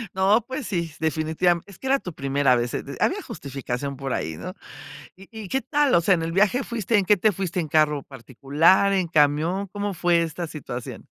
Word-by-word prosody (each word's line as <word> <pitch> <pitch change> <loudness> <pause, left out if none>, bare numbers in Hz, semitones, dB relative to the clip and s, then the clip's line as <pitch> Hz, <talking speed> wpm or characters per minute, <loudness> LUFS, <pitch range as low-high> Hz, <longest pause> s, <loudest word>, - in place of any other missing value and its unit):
No, 195 +4 +3
pues 260 +1 -5
sí, 175 -5 -1
s - - -18
Definitiva 160 +2 +1
Es 200 -3 -14
que - - -12
era 275 +1 +3
tu 180 - -8
primera 135 -2 +2
vez, 120 0 -2
eh, - - -2
de - - -8
Había - - +1
justificación 135 0 -5
por 135 -1 -4
ahí, 80 -1 -3
¿no? - - -7 0.6
¿Y 195 +1 -15 0.2
y - - -8
qué 265 - 0
tal? 290 -2 +1
O 170 - +5
sea, 185 +2 +4
en 165 - -3
el 165 - -3
viaje 210 +8 +2
fuiste 230 -2 -1
¿En 200 - +2
qué 210 - +5
te 215 +4 +3
fuiste? 185 -1 -3
¿En 165 - -2
carro 150 -1 +2
particular, 145 - +2
en 185 -3 +1
camión? 160 +5 +2
¿Cómo 205 +1 -4
fue 175 -1 +2
esta 165 +1 -4
situación? 125 -5 -7
170 Hz, 220 wpm, -24 LUFS, 145-195 Hz, 0.6 s, O